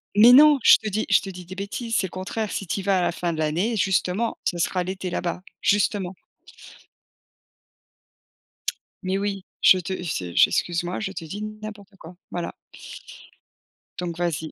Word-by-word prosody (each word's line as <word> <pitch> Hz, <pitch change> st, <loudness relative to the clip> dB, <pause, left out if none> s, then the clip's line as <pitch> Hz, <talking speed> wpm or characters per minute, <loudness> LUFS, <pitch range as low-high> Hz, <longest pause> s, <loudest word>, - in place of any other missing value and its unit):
Mais 225 Hz, +4 st, +8 dB
non! 295 Hz, +1 st, +8 dB
Je -, -, +8 dB
te 215 Hz, -, -3 dB
dis 215 Hz, +2 st, -1 dB
je 195 Hz, -, +5 dB
te 195 Hz, -, -7 dB
dis 180 Hz, -1 st, -9 dB
des 185 Hz, +2 st, -9 dB
bêtises! 220 Hz, +4 st, -4 dB
C'est 190 Hz, -, +1 dB
le -, -, -17 dB
contraire! 200 Hz, +3 st, -4 dB
Si 195 Hz, -, -4 dB
tu 195 Hz, -, -2 dB
y -, -, -10 dB
vas 195 Hz, 0 st, +2 dB
à -, -, +1 dB
la 175 Hz, -, +1 dB
fin 175 Hz, 0 st, -2 dB
de 160 Hz, -, -5 dB
l'année, 175 Hz, +9 st, 0 dB
justement, 190 Hz, +3 st, 0 dB
ce 175 Hz, -, -1 dB
sera 180 Hz, +1 st, 0 dB
l'été 185 Hz, 0 st, -4 dB
là-bas, 175 Hz, 0 st, -3 dB, 0.2 s
justement. 200 Hz, -2 st, +1 dB, 2.9 s
Mais 190 Hz, +1 st, 0 dB
oui! 195 Hz, -1 st, -3 dB, 0.2 s
Je 185 Hz, -, +7 dB
te 180 Hz, +1 st, -4 dB
f 180 Hz, -, -6 dB
c'est 90 Hz, -7 st, -4 dB
j -, -, +6 dB
excuse-moi, 175 Hz, +1 st, -1 dB
je 215 Hz, -3 st, -3 dB
te 185 Hz, -4 st, -7 dB
dis 200 Hz, +7 st, -7 dB
n'importe 215 Hz, -1 st, -8 dB
quoi! 175 Hz, 0 st, -12 dB
Voilà. 175 Hz, -1 st, -4 dB, 1.5 s
Donc 170 Hz, -2 st, -4 dB
vas-y. 160 Hz, -3 st, -2 dB
190 Hz, 180 wpm, -24 LUFS, 175-210 Hz, 2.9 s, Mais